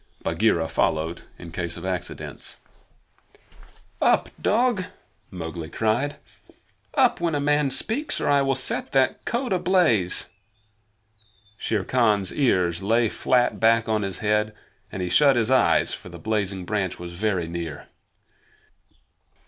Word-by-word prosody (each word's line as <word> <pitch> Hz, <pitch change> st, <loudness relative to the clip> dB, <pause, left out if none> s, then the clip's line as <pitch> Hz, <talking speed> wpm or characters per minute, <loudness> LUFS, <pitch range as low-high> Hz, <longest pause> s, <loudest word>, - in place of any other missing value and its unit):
Bagheera 85 Hz, -1 st, +1 dB
followed 80 Hz, +1 st, -1 dB, 0.2 s
in 85 Hz, -2 st, -10 dB
case 85 Hz, 0 st, -4 dB
of -, -, -8 dB
accidents. 90 Hz, -1 st, -4 dB, 1.4 s
"Up, -, -, +3 dB
dog!" 225 Hz, -3 st, +2 dB, 0.4 s
Mowgli 80 Hz, -3 st, -6 dB
cried. 115 Hz, +9 st, 0 dB, 0.8 s
"Up, 260 Hz, -, +3 dB
when 165 Hz, -3 st, 0 dB
a -, -, 0 dB
man 145 Hz, 0 st, +2 dB
speaks, 240 Hz, -, 0 dB
or -, -, -2 dB
I 140 Hz, -1 st, +4 dB
will 135 Hz, -1 st, +1 dB
set 130 Hz, -1 st, -2 dB
that 135 Hz, -1 st, +2 dB
coat 240 Hz, -2 st, -1 dB
ablaze!" 175 Hz, -, +2 dB, 1.3 s
Shere 110 Hz, -2 st, -1 dB
Khan's 105 Hz, -6 st, +1 dB
ears 90 Hz, -, +1 dB
lay 115 Hz, +3 st, +2 dB
flat 125 Hz, +2 st, +1 dB
back 115 Hz, 0 st, +3 dB
on 110 Hz, -1 st, +1 dB
his 95 Hz, -3 st, -3 dB
head, 105 Hz, 0 st, +1 dB, 0.4 s
and 95 Hz, -, -4 dB
he 90 Hz, -, -2 dB
shut 140 Hz, +9 st, +5 dB
his 120 Hz, +1 st, +1 dB
eyes, 130 Hz, -, +3 dB
for -, -, -8 dB
the -, -, -10 dB
blazing 100 Hz, -4 st, -2 dB
branch 100 Hz, -2 st, -2 dB
was 85 Hz, 0 st, -8 dB
very 95 Hz, -2 st, -1 dB
near. 85 Hz, -3 st, -6 dB
110 Hz, 135 wpm, -24 LUFS, 90-135 Hz, 1.4 s, shut